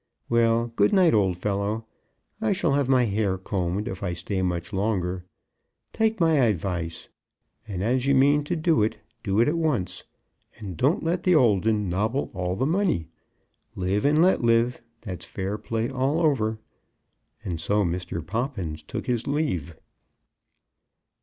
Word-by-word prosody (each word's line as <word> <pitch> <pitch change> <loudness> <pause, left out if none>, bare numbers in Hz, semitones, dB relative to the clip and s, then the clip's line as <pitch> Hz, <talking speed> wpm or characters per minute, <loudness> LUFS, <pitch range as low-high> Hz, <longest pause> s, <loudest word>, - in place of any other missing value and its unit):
Well, 115 0 +3
good 105 -1 +3
night, 185 -4 +5
old 95 -5 +2
fellow. 105 +3 -2 0.6
I 220 -2 +2
shall 175 -6 +1
have 140 -2 +1
my 130 -2 +4
hair 100 -3 0
combed 95 0 -2
if 95 - -5
I 95 -3 -2
stay 95 +3 -3
much 90 +1 -2
longer. 95 -3 -1 0.7
Take 220 -1 +1
my 165 -2 +4
advice, 85 - -1 0.6
and 95 -3 -4
as 125 +4 +1
you 140 - +4
mean 145 +2 +4
to 175 - -1
do 160 -6 +2
it, 105 - 0 0.3
do 100 -2 0
it 120 - +3
at 165 +3 +1
once. 100 - -1 0.5
And 100 -5 -7
don't 140 - +1
let 170 +2 0
the 180 -1 +3
old 110 -8 +3
'un 105 -2 +1
nobble 110 +9 -1
all 90 -1 -2
the 130 - 0
money. 165 - 0 0.7
Live 95 +3 0
and 150 +2 +3
let 185 - +3
live. 115 +1 +2 0.2
That's 90 -5 -7
fair 100 +2 -4
play 115 0 -2
all 135 +4 0
over." 125 -9 +1 0.9
And 85 -3 -3
so 105 +5 +1
Mr. 85 -2 -3
Poppins 95 - -3
took 75 - -6
his 120 -3 -1
leave. 135 - -1
110 Hz, 160 wpm, -25 LUFS, 95-140 Hz, 0.9 s, night